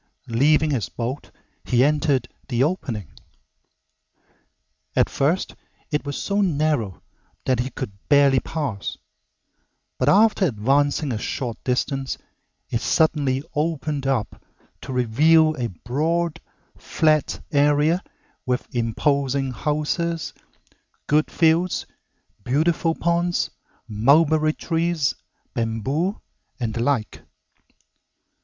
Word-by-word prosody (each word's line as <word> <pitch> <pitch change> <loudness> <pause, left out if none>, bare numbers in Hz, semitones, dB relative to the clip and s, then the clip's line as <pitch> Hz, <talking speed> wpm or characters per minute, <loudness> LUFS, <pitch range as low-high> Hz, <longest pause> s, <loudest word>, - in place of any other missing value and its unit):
Leaving 150 +6 +3
his 125 -7 -1
boat, 125 +4 -4 0.3
he 125 -1 +3
entered 145 -3 +2 0.2
the 125 -1 +1
opening. 135 - -2 1.9
At - - +3
first 160 +7 0 0.4
it 150 -1 -1
was 145 - -3
so 200 +1 0
narrow 150 - 0 0.4
that 130 -2 +1
he 125 +2 -1
could 110 - -5 0.2
barely 140 -2 +5
pass, 135 -12 -4 1.0
but 130 - +3
after 210 +3 +5
advancing 140 +4 +1
a 110 - -2
short 120 -1 -4
distance 135 +1 -1 0.5
it 115 - 0
suddenly 145 -5 +2
opened 150 -2 -1
up 130 -6 -1 0.4
to - - -7
reveal 155 +6 +4
a 120 -2 -1
broad, 160 - -1 0.3
flat 155 -2 +1
area 150 +4 +3 0.4
with 125 0 -1
imposing 135 +3 0
houses, 155 +4 -2 0.7
good 150 +1 +2
fields, 170 +2 +2 0.6
beautiful 160 - +1
ponds, 170 +1 0 0.4
mulberry 155 +8 +3
trees, 165 -3 0 0.4
bamboo, 130 - -1 0.4
and 115 -3 -2
the 115 - -2
like. 120 -4 -1
145 Hz, 100 wpm, -23 LUFS, 125-160 Hz, 1.9 s, barely